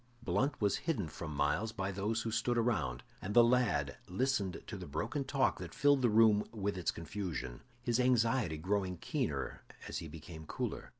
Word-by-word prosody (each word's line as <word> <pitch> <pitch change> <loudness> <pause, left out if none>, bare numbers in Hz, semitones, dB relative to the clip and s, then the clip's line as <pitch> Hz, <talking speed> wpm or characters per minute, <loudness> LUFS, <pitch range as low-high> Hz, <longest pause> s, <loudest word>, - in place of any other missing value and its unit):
Blunt 120 +8 +1
was 100 -2 +2
hidden 110 - 0
from 80 +1 -6
Myles 75 +10 +1
by 95 -2 -2
those 105 +4 -1
who 115 - -2
stood 120 +2 +1
around, 80 - 0 0.2
and 100 +2 -4
the 120 - +9
lad 115 - +2
listened 100 -1 0
to - - -6
the - - -7
broken 110 - -2
talk 135 0 +1
that - - -7
filled 145 -1 +4
the 120 - +4
room 105 -1 +5
with 100 -2 -2
its 90 -2 -1
confusion, 85 -8 -4 0.2
his 120 0 +1
anxiety 120 -7 +3
growing 95 +2 -1
keener - - -2 0.3
as - - -3
he 80 - -6
became 80 0 -10
cooler. - - -4
105 Hz, 180 wpm, -34 LUFS, 85-120 Hz, 0.3 s, the